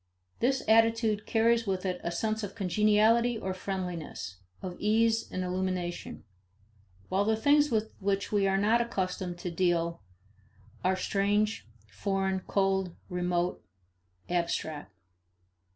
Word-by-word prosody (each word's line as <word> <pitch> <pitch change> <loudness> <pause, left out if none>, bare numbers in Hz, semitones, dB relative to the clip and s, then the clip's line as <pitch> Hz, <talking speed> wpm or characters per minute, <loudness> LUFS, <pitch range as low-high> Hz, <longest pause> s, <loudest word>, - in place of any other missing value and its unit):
This 265 +2 +1
attitude 225 -1 +3
carries 230 0 +3
with 190 -1 -1
it 180 -1 -2
a 170 - -2
sense 215 +5 -1
of 205 -2 -6
congeniality 215 +4 +3
or 190 -3 -3
friendliness, 180 - -5 0.2
of 180 -1 -6
ease 225 +2 +2
and 185 - -2
illumination; 180 -1 -3 0.9
while 195 +2 +2
the 220 +1 +2
things 290 +5 +4
with 220 -1 -1
which 200 0 -1
we 200 -2 +3
are 195 0 +2
not 220 +4 +3
accustomed 185 -5 -2
to 175 0 -5
deal 170 - 0 0.8
are 185 +1 +3
strange, 205 - 0 0.2
foreign, 190 - -1
cold, 190 -2 0
remote, 180 0 -1 0.6
"abstract." 160 - -2
195 Hz, 120 wpm, -29 LUFS, 180-220 Hz, 0.9 s, things